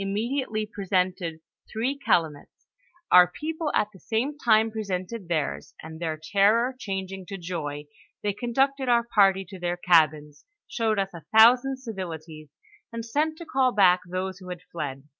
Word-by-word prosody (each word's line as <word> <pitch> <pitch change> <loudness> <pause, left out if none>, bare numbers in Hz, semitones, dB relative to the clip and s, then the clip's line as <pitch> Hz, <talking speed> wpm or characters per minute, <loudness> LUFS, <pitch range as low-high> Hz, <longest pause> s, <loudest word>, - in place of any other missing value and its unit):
95 195 - -3
mediately 225 -1 -2
presented 185 -4 -1 0.4
three 245 +6 -1
calumets; 155 - -1 0.5
our 180 -1 +8
people 315 0 -3
at - - +2
the 190 - -15
same 240 +10 -2
time 225 -5 +3
presented 200 -1 -4
theirs, 155 -4 -3
and 160 0 -9
their 160 -2 -3
terror 210 +9 +2
changing 195 -3 -5
to 195 +2 -7
joy, 155 -5 -5 0.4
they 205 -1 0
conducted 265 +5 0
our 235 -1 +4
party 195 -4 +3
to 190 0 -10
their 175 0 -2
cabins, 155 -4 +2 0.2
showed 220 -2 -1
us 195 -1 0
a 170 - -9 0.2
thousand 250 +4 +6
civilities, 165 - -8 0.4
and 230 -1 -5
sent 305 +6 -1
to 335 - -9
call 260 -4 +2
back 185 -4 +5
those 185 +1 -4
who 185 -1 -11
had 180 -1 -6
fled. 140 -5 -5
195 Hz, 160 wpm, -26 LUFS, 175-235 Hz, 0.5 s, our